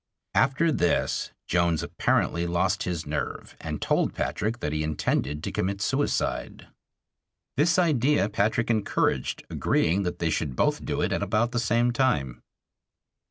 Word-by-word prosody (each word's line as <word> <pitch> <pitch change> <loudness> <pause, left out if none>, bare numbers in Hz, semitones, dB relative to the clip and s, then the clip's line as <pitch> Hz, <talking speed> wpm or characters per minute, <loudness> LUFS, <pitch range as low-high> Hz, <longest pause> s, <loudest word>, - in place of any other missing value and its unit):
After 135 +6 +3
this 90 - +1 0.2
Jones 85 -2 +1
apparently 85 0 0
lost 85 +2 +1
his 85 -3 -3
nerve 75 +1 -4
and - - -4
told - - +1
Patrick 115 +3 -2
that 75 - -2
he 75 - -1
intended 75 -1 -1
to - - -3
commit 100 +2 -1
suicide. 135 +7 -1 0.9
This 155 +6 +3
idea 145 - +3
Patrick 110 +3 +1
encouraged, 110 -3 0
agreeing 90 +5 +1
that 90 -3 -2
they 85 -2 0
should 75 -4 -2
both - - +1
do - - -2
it - - 0
at - - -1
about 115 +2 +1
the 120 - 0
same 120 +1 +2
time. 75 - 0
100 Hz, 145 wpm, -26 LUFS, 80-120 Hz, 0.9 s, After